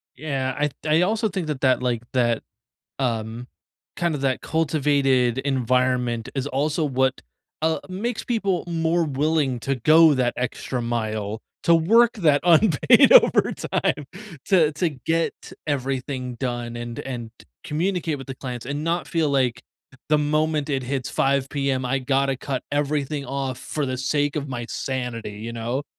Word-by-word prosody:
Yeah, 130 -2 -2
I 150 +1 +2
th - - -21
I 155 +2 +3
also 220 +4 +1
think 185 -4 -3
that, 130 -4 +1
like, 120 -2 -1
that, 120 -3 +1 0.6
um, 115 -2 -2 0.5
kind 170 -2 0
of 140 - -4
that 130 -1 0
cultivated 140 -6 +1
environment 125 -3 0
is 135 -1 -2
also 150 +3 0
what, 130 -2 +1 0.4
uh, 160 0 +2
makes 215 +6 -3
people 200 -7 0
more 165 0 +1
willing 145 -3 0
to 135 +3 -1
go 155 +5 +6
that 125 -2 0
extra 125 0 -3
mile, 110 -2 -2 0.2
to 170 - +5
work 225 +9 +5
that 155 - +3
unpaid 170 -1 +5
overtime 145 -3 +3 0.4
to 170 -6 +4
to 160 +4 0
get 160 +4 -1 0.3
everything 130 -2 -2
done 120 -1 -4
and 120 0 -6
and 120 -4 -6 0.3
communicate 165 -1 -1
with 135 - -9
the 135 - -6
clients 125 -3 -6
and 145 +2 -3
not 170 +1 -1
feel 160 -3 0
like 125 -4 +1 0.5
the 150 - +5
moment 150 0 0
it 135 -3 -1
hits 130 0 -3
5 135 0 +1
PM, 135 -2 -1
I 135 +2 0
gotta 135 +1 +1
cut 130 0 -4
everything 145 0 -1
off 135 -2 -3
for 150 -2 -3
the 130 0 -2
sake 145 +3 0
of 145 -1 -2
my 120 -3 -4
sanity, 125 -5 -4
you 115 +2 -6
know? 120 +4 -3
135 Hz, 155 wpm, -23 LUFS, 125-155 Hz, 0.6 s, go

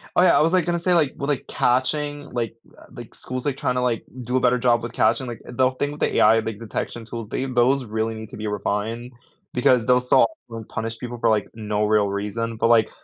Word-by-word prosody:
Oh, - - +5
yeah, 180 - +5
I - - +4
was, 165 +3 +2
like, 180 -3 +3
gonna 170 -1 0
say, 180 +1 +2
like, 155 -5 +3
well, 140 - -3
like, 145 -3 -1
catching 145 +3 0
like, 115 -2 -3 0.2
uh, - - -15
like, - - -11
schools, 130 0 -6
they 145 - 0
tryna, 125 -2 -1
like, 120 -2 -1 0.2
do 125 +2 0
a - - +3
better 125 0 +3
job 120 -1 +2
with 120 0 -5
catching, 115 +4 +2
like, 120 - -7
they'll 130 +1 +3
think 145 +3 -4
the - - 0
AI 110 +1 +6
like, 110 -1 -5
the 115 - -8
detection 115 +2 -4
tools, 115 -2 -6
they 130 - -2
those 130 +1 +2
really 110 +1 -2
need 110 0 -8
to - - -10
be 105 0 -4
refined 110 +4 -3 0.4
because 125 -1 +3
they'll 125 0 +4
so 125 - +4 0.2
often 115 -1 -7
punish 115 +1 -4
people 120 -1 -6
for, - - +2
like, 105 -2 +1
no 105 -1 -1
real 105 -1 +3
reason, 110 +3 -3
but 115 - +2
like, 115 -2 +4
120 Hz, 245 wpm, -23 LUFS, 110-130 Hz, 0.4 s, AI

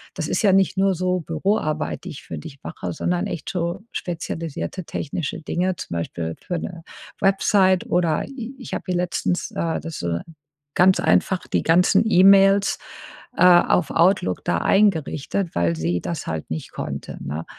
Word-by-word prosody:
das - - -3
ist - - 0
ja 200 - +5
nicht 195 0 +3
nur 195 -1 +3
so 185 +1 0
Büroarbeit, 160 -1 -1
die - - -5
ich 145 -2 -9
für - - -7
dich 140 -4 -10
mache, 90 - -5
sondern 85 +1 -1
echt 165 -3 -5
so 175 +1 -2
spezialisierte 165 +1 -4
technische 150 0 -4
Dinge.“ 180 +3 -1
Zum 85 - -6
Beispiel 80 -1 -3
für 175 - -3
'ne 170 -2 -7 0.4
Website, 195 -1 +3
oder 170 -3 +1
i 260 -2 -7
ich 250 - -8
habe - - -3
ihr 180 - +1
letztens, 175 0 -1
äh, 165 -1 -2
das 165 -2 -6
so 85 -1 -1 0.6
ganz 185 +1 +5
einfach 185 -2 +2
die - - 0
ganzen 175 +3 +4
E-Mails, 195 -1 +5 0.6
äh, - - +4
auf 175 -2 +5
Outlook 170 - +2
da 85 - +1
eingerichtet, 180 - +1
weil 85 -1 +2
sie 85 +2 -1
das 170 -3 -5
halt 80 -1 -4
nicht 80 0 -5
konnte, 70 0 -6
ne? 75 +3 -5
170 Hz, 165 wpm, -22 LUFS, 140-190 Hz, 0.6 s, ja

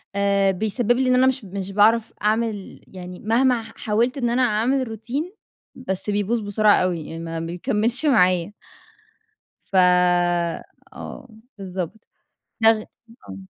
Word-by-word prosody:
آآ، 200 -1 +2
بيسبِّب 220 +5 -1
لي 255 +2 +2
إن 250 - +4
أنا 260 +1 +4
مش 260 -3 -1
مش 195 0 -6
باعرف 220 +3 +3
أعمل 215 -2 -2
يعني 180 -1 -10
مهما 240 +2 +2
ح 225 0 -13
حاولت 230 +5 0
إن 240 -3 0
أنا 245 +2 +1
أعمل 250 +3 +1
روتين، 245 - -5 0.4
بس 210 -5 -4
بيبوظ 205 +3 0
بسرعة 210 0 +3
أوي، 180 -2 -1
يعني 165 - -7
ما 165 0 -5
بيكمِّلش 210 - -1
معايا. 185 - +3 1.1
ف 195 - -8 1.2
آه، 265 - -9 0.3
بالضبط. 190 +2 -6 0.5
ده 225 0 +7
غ 215 -1 -2 0.5
آه. 95 - -7
215 Hz, 140 wpm, -22 LUFS, 195-240 Hz, 1.2 s, ده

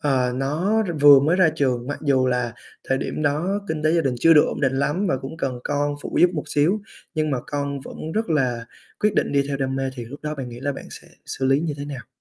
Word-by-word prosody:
ờ, 130 -4 +1
nó 160 +12 0
r - - -2
vừa 145 -1 +9
mới 155 +6 +2
ra 185 -4 +5
trường, 125 -5 0
mặc 145 - -4
dù 135 -3 +2
là 125 -2 0 0.4
thời 135 0 +2
điểm - - -3
đó 160 +8 0
kinh 160 -1 -2
tế 155 +1 +3
gia 170 - +3
đình 135 -5 0
chưa 165 - +6
được 150 - +7
ổn - - -4
định 135 -2 +2
lắm 155 +8 0
và 135 - +1
cũng 135 +4 -7
cần 130 -6 -3
con 145 0 0
phụ - - -5
giúp 175 - +6
một 150 - -3
xíu, 170 +9 +2 0.3
nhưng 155 -1 0
mà 135 - 0
con 140 -1 -3
vẫn - - -10 0.2
rất 220 -3 -1
là 125 -6 0 0.4
quyết 210 0 +2
định - - +1
đi 140 -1 +3
theo 140 - -1
đam 135 -1 -2
mê 135 0 -1
thì 120 -3 -6
lúc 135 +6 -10
đó 150 0 -3
bạn 135 -4 -6
nghĩ 120 0 -9
là 145 +1 -1
bạn - - -9
sẽ - - -11 0.2
xử 135 - -4
lý 135 +2 +3
như 160 -1 -2
thế 140 - -4
nào? 135 -5 -7
145 Hz, 270 wpm, -23 LUFS, 135-155 Hz, 0.4 s, vừa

